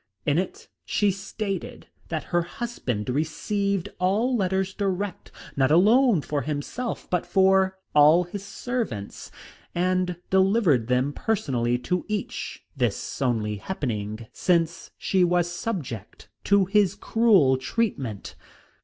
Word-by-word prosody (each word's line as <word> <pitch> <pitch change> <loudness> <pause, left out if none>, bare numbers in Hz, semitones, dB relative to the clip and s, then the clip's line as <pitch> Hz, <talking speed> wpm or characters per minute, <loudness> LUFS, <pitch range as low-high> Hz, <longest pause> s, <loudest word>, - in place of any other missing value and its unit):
In 145 +3 +3
it 405 - -5 0.2
she 205 -1 +1
stated 195 0 -5 0.2
that 160 -3 -2
her 175 - +4
husband 170 - -4
received 185 - -1
all 210 +8 +2
letters 190 -2 0
direct, 195 -1 -3 0.2
not 135 -1 +3
alone 210 - +5
for 145 -1 -2
himself, 150 - -4
but 180 -2 +1
for 190 0 +3 0.2
all 150 +4 +6
his 185 +3 -7
servants, 200 - -4 0.5
and 180 0 +1 0.2
delivered 190 - +3
them 125 +3 +1
personally 130 - 0
to 180 +8 -2
each, 210 -2 -4
this 125 0 -2
only 110 -5 0
happening 110 - -4
since 170 -1 0
she 190 -2 +2
was 175 0 +2
subject 175 - -5 0.2
to 200 -1 +4
his 200 -1 +2
cruel 205 - +4
treatment. 130 - -2
180 Hz, 120 wpm, -25 LUFS, 140-200 Hz, 0.5 s, all